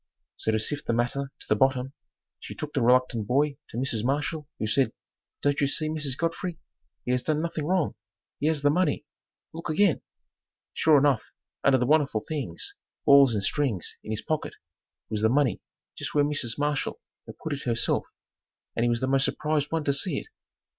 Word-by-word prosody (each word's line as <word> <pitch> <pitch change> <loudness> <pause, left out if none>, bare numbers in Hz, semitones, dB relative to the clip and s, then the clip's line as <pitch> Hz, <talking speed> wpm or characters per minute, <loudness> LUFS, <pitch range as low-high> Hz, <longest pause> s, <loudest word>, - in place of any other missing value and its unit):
So 110 - 0
to 110 - +2
sift 145 +7 -3
the - - +2
matter 130 +4 -1
to - - -11
the 105 - +3
bottom, 130 +2 +2 0.5
she - - -8
took 150 -1 -6
the 135 - +1
reluctant 125 -3 +3
boy 140 +3 +2
to - - -7
Mrs. 120 -4 0
Marshall, 145 +3 -1
who - - -2
said, 130 +5 +2 0.5
"Don't 145 0 +2
you 140 - +4
see, 155 +2 -1
Mrs. 150 -4 -2
Godfrey, 165 +1 -2 0.5
he 125 - 0
has 125 0 +2
done 155 +2 0
nothing 160 -2 -2
wrong; 180 -4 +1 0.5
he 150 - +1
has 155 -3 +1
the 145 - +5
money; 180 -2 +1 0.5
look 165 +1 -6
again." 165 +1 +3 0.7
Sure 155 -2 +5
enough, 140 -4 +3 0.4
under 135 -1 +5
the 125 - +1
wonderful 145 -5 +3
things, 135 - -4 0.3
balls 140 -4 +7
and 100 - 0
strings 120 - 0
in - - -10
his 110 -1 -2
pocket, 155 -2 -2 0.6
was 105 -1 -1
the 110 - +4
money 130 -4 +2 0.3
just - - -5
where 145 -1 +5
Mrs. 140 -6 -1
Marshall 145 -1 -1 0.3
had - - -10
put 160 - -4
it 140 - -5
herself 120 -1 0 0.7
and 115 - +1
he 120 - +3
was 120 0 0
the 130 - +1
most 135 0 +3
surprised 150 -1 0
one 165 -1 0
to 140 - +2
see 175 +7 0
it. - - -6
140 Hz, 195 wpm, -27 LUFS, 125-150 Hz, 0.7 s, balls